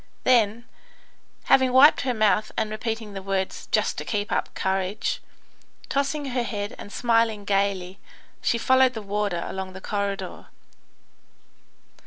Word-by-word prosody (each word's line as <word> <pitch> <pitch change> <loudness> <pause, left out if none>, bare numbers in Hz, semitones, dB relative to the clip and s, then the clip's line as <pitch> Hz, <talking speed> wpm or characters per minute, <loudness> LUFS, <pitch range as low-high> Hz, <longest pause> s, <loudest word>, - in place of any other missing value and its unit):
Then, 235 -2 +3 0.8
having 260 -1 +4
wiped 270 +4 +7
her 255 -1 0
mouth 215 0 +2
and 220 -1 -1
repeating 220 -1 -4
the 195 - -5
words 190 -1 -3
"just - - +1
to - - -4
keep 205 -1 -2
up - - -1
courage," 195 - -1 0.7
tossing 280 +1 -1
her 245 0 0
head 205 -3 -4
and 205 - -9
smiling 230 -3 +1
gaily, 195 -2 0 0.4
she 235 - +1
followed 260 +1 +4
the 220 - -5
warder 200 -3 -1
along 190 -1 -5
the 190 - -8
corridor. 200 -1 -4
215 Hz, 135 wpm, -25 LUFS, 200-240 Hz, 0.8 s, wiped